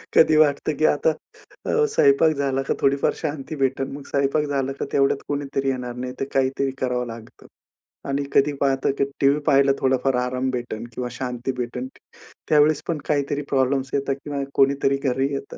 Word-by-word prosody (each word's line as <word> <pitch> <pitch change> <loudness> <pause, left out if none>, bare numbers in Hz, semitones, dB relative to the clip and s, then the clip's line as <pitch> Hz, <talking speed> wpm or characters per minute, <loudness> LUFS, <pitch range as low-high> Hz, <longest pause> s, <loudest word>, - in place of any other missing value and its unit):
कधी 155 -1 +6
वाटतं 150 0 +2
की 155 - +3
आता 150 +2 +3 0.5
अ, 455 -1 +2
स्वयंपाक 155 - +4
झाला 135 -1 0
का - - 0
थोडीफार 140 0 +2
शांती 150 -1 -4
भेटेल. 135 -1 0
मग 140 0 -7
स्वयंपाक 140 +2 +1
झालं 135 -2 -1
का, - - -1
तेवढ्यात 135 0 +3
कुणीतरी 140 -1 -2
येणार, 125 -2 -3
नाही 125 0 -5
तर - - -1
काहीतरी 135 0 +1
करावं 125 -1 -1
लागतं. 115 -1 -11 0.6
आणि 140 +1 0
कधी 145 +1 +3
पाहतं 135 -1 +2 0.3
टीव्ही 140 +2 +4
पाहायला 140 -1 +5
थोडाफार 130 0 +1
आराम 130 +1 -2
भेटेल 120 -2 -4
किंवा 125 +1 -3
शांती 125 +1 -4
भेटेल. 125 +1 -4 0.6
त्यावेळेस 150 0 +4
पण 170 - -1
काहीतरी 145 -1 0
प्रॉब्लम्स 135 0 +1
येतात, 135 -1 0
किंवा 140 -1 -3
कोणीतरी 140 0 +3
घरी 135 0 +1
येतं. 140 0 -6
135 Hz, 165 wpm, -23 LUFS, 130-145 Hz, 0.6 s, कधी